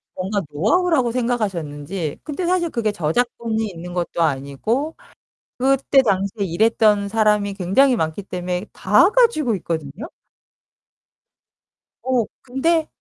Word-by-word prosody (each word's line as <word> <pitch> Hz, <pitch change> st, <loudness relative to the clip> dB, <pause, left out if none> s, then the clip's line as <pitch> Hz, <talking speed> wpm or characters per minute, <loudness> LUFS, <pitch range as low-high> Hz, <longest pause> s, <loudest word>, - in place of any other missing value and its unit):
뭔가 195 Hz, +2 st, -2 dB
노하우라고 245 Hz, -, +2 dB
생각하셨는지. 185 Hz, -, -3 dB
근데 315 Hz, +4 st, -4 dB
사실 350 Hz, -1 st, +1 dB
그게 220 Hz, -5 st, -1 dB
저작권이 220 Hz, +5 st, -1 dB
있는 175 Hz, 0 st, -9 dB
것도 175 Hz, -1 st, -2 dB
아니고 160 Hz, -, -1 dB, 0.6 s
그때 270 Hz, +1 st, +3 dB
당시에 200 Hz, -1 st, 0 dB
일했던 210 Hz, +2 st, +2 dB
사람이 210 Hz, -2 st, +1 dB
굉장히 220 Hz, +8 st, +3 dB
많기 160 Hz, +3 st, -2 dB
때문에 180 Hz, +1 st, -4 dB
다 210 Hz, -, +4 dB
가지고 430 Hz, -, +3 dB
있거든요. 160 Hz, -, -5 dB, 2.0 s
어, 250 Hz, -4 st, +1 dB, 0.2 s
근데 315 Hz, +6 st, 0 dB
215 Hz, 275 characters per minute, -21 LUFS, 180-260 Hz, 2.0 s, 다